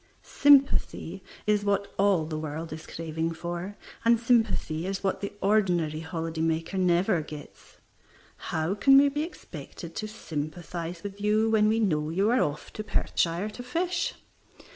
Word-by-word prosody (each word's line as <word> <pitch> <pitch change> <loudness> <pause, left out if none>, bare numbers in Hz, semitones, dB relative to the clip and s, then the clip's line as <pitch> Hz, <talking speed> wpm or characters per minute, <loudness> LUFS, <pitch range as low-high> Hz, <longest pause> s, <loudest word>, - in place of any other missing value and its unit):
Sympathy 275 - +3 0.2
is 210 -1 +2
what 200 0 0
all 195 -5 +3
the 155 0 -4
world 155 +1 -5
is 160 0 -9
craving 165 0 -3
for, 175 +4 -5 0.3
and 230 0 +4
sympathy 220 -8 +1
is 195 0 -3
what 195 - 0
the 200 - -3
ordinary 180 -7 +2
holiday 160 0 -4
maker 165 +3 -1
never 180 0 +3
gets. 150 -1 -11 0.7
How 160 +4 0
can 270 +7 +6
we 280 +1 +6
be 295 +2 -2
expected 190 - -8
to 215 - -3
sympathize 170 -2 -5
with 200 0 -7
you 215 +2 +2
when 215 -1 +4
we 220 +1 +2
know 155 -8 +1
you 195 +7 +2
are 255 - +3
off 150 0 -3
to 215 - -5
Perthshire 180 -1 0
to 245 - -8
fish? 340 +9 -1
190 Hz, 155 wpm, -27 LUFS, 160-215 Hz, 0.7 s, can